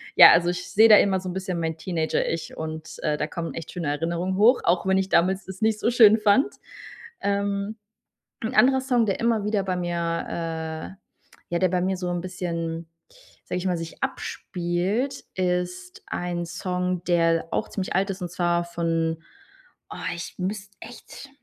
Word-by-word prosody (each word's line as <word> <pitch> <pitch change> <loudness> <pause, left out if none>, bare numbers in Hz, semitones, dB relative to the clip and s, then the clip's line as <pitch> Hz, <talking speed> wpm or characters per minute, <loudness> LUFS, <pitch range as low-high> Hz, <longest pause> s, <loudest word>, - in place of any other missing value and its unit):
ja, - - +11
also 175 +1 +4
ich 180 +1 -4
seh 220 +2 +7
da 210 - +10
immer 190 -2 +3
so 185 - -8
'n - - -4
bisschen 190 -2 -3
mein 160 -1 -2
Teenager-Ich 165 -1 -2
und, 160 0 -6
äh, 150 -1 +1
da 150 - -1
kommen 165 +1 -5
echt 165 - -7
schöne 170 -4 -3
Erinnerungen 170 +5 -1
hoch, 235 +5 +5
auch 175 +2 +2
wenn 190 0 +3
ich 190 0 0
damals 190 +3 +2
das 190 +1 -9
nicht 220 -1 +2
so 235 - +2
schön 220 -2 +7
fand. 215 - +3 0.7
Ähm, 200 +1 -1 0.7
'n 250 +4 -2
anderer 265 +1 +5
Song, 245 -4 +2
der 195 - 0
immer 230 -3 +1
wieder 210 -2 +1
bei 185 -1 -1
mir 175 -1 -2
äh, 165 -1 -3 0.6
ja 170 - +1
der 185 - +4
bei 180 0 0
mir 190 0 0
so 180 -1 -3
'n 175 -1 -1
bisschen- 170 -3 -4 0.6
sage 180 - -4
ich 185 - -4
mal- 180 - +1
sich 165 0 -8
abspielt, 185 +9 -2
ist 180 0 -2
ein 175 -1 -3
Song, 180 0 -2
der 165 -2 +2
auch - - -1
ziemlich 190 -3 -4
alt 195 +2 +2
ist, 190 0 -5
und 175 - -4
zwar 175 -1 +1
von 165 -1 -1 0.7
boah - - -7
ich 170 - -7
müsste 200 +1 -4
echt 245 +3 -11
180 Hz, 180 wpm, -25 LUFS, 170-200 Hz, 0.7 s, ja